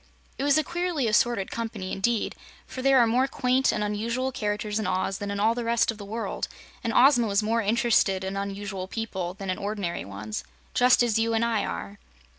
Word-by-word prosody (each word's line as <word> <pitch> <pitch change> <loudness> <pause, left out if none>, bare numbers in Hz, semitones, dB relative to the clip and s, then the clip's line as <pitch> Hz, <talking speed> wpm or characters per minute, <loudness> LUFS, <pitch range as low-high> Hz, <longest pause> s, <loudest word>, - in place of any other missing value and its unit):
It - - -1
was 285 +1 +4
a 310 - +3
queerly 345 -3 -1
assorted 220 -2 +2
company, 220 -5 -4
indeed, 225 +3 0 0.3
for 260 - -7
there 270 0 +5
are 240 - +6
more 250 +4 +2
quaint 260 0 +2
and 210 - -1
unusual 230 +5 -1
characters 210 -2 -2
in 215 - -2
Oz 185 +1 -1
than 205 - -4
in 200 0 -3
all 220 +2 +3
the 240 0 -3
rest 230 0 +2
of 220 - -11
the 200 - -7
world, 225 +3 -3 0.4
and 230 - 0
Ozma 245 -1 +5
was 200 +1 +1
more 230 +2 +1
interested 210 -3 +2
in 190 +1 -3
unusual 200 -1 -4
people 190 -5 -4
than 195 -2 -4
in 185 - -3
ordinary 200 -4 -3
ones 105 +2 -6 0.3
just 250 0 +5
as 225 -2 +2
you 225 0 +1
and 225 +1 +2
I 230 -2 0
are. 200 +1 -6
220 Hz, 210 wpm, -26 LUFS, 200-240 Hz, 0.4 s, are